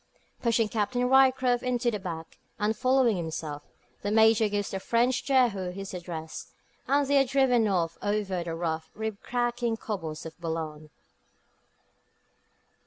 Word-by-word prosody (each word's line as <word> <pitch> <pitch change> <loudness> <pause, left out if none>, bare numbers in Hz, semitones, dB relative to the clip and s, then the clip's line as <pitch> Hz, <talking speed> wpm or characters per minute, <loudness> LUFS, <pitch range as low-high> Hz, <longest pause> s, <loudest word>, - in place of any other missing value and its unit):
Pushing 230 -2 +2
Captain 240 +4 0
Ryecroft 260 -2 +4
into 245 -1 0
the 210 - -3
back, 165 -4 -7 0.2
and 210 +2 0
following 255 -4 +3
himself, 160 -3 -5 0.3
the 205 - -2
Major 220 0 +5
gives 205 0 -2
the 195 - -3
French 240 +5 +1
Jehu 240 -9 +2
his 195 +2 -7
address, 170 -3 -7 0.3
and 285 +1 +3
they 280 0 +4
are - - +5
driven 255 -4 +3
off 170 -4 0
over 205 -4 -1
the 165 -1 -4
rough, 160 -1 -3
rib 220 -1 -4
cracking 240 -1 -1
cobbles 165 -10 -5
of 160 - -8
Boulogne. 160 -2 -4
210 Hz, 140 wpm, -28 LUFS, 170-245 Hz, 0.3 s, Major